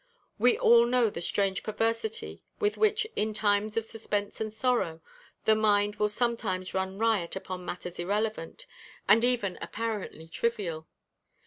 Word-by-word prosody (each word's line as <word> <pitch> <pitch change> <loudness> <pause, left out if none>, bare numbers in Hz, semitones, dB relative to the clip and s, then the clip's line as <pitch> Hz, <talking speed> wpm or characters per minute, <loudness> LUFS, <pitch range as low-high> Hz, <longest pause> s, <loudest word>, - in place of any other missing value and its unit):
We 245 +3 +5
all 235 0 +6
know 240 -3 +3
the 170 - -6
strange 195 +2 0
perversity 230 - -2 0.2
with 415 -1 +1
which, 430 0 +2
in 215 0 -1
times 210 +1 +1
of 225 - 0
suspense 210 -2 -3
and 215 -1 -2
sorrow, 220 -8 0 0.5
the 220 - +6
mind 210 -1 +2
will 210 0 +2
sometimes 210 -5 -1
run 190 0 -2
riot 215 -6 +1
upon 185 -1 -6
matters 180 -1 -6
irrelevant, 205 -1 -2 0.4
and 220 +3 +6
even 240 -7 +1
apparently 210 -8 -4
trivial. 170 -5 -2
215 Hz, 140 wpm, -29 LUFS, 190-230 Hz, 0.5 s, all